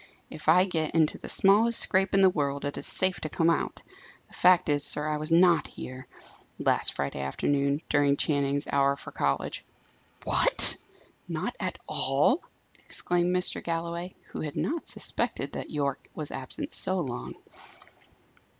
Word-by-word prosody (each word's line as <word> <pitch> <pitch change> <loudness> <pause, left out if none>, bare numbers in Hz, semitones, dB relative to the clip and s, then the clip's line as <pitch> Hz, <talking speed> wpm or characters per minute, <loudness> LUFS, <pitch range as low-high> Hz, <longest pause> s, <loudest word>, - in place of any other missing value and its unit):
"If 155 0 -4
I 180 +3 +6
get 160 -4 -2
into 160 -2 +2
the - - -9
smallest 220 +4 +3
scrape 190 0 +1
in 195 - +4
the 190 - +6
world, 140 -4 -2
it 145 - -3
is - - -2
safe 185 -1 +3
to 155 - -4
come 165 +2 +2
out. - - -3 0.5
The - - -21
fact 180 0 +4
is, 145 -1 +2
sir, 150 +1 +1
I 155 0 -1
was 155 +2 -5
not 170 -1 +4
here, 130 +1 -9 0.5
last - - +2
Friday 70 0 -3
afternoon, 140 - -1
during 145 -1 +2
Channing's 140 -1 0
hour 140 0 +1
for 140 - -10
college." - - -2 0.6
"What! - - +5 0.5
not - - -4
at - - -3
all?" 145 - +2 0.4
exclaimed 175 0 -1
Mr. 180 0 +1
Galloway, 170 +2 -4 0.2
who - - -6
had 150 -2 -5
not 325 +2 -2
suspected - - -2
that - - -6
Yorke 140 -3 -3
was 155 -2 -4
absent 130 -1 -6
so 185 0 +2
long. 130 -8 -5
155 Hz, 160 wpm, -27 LUFS, 140-180 Hz, 0.6 s, I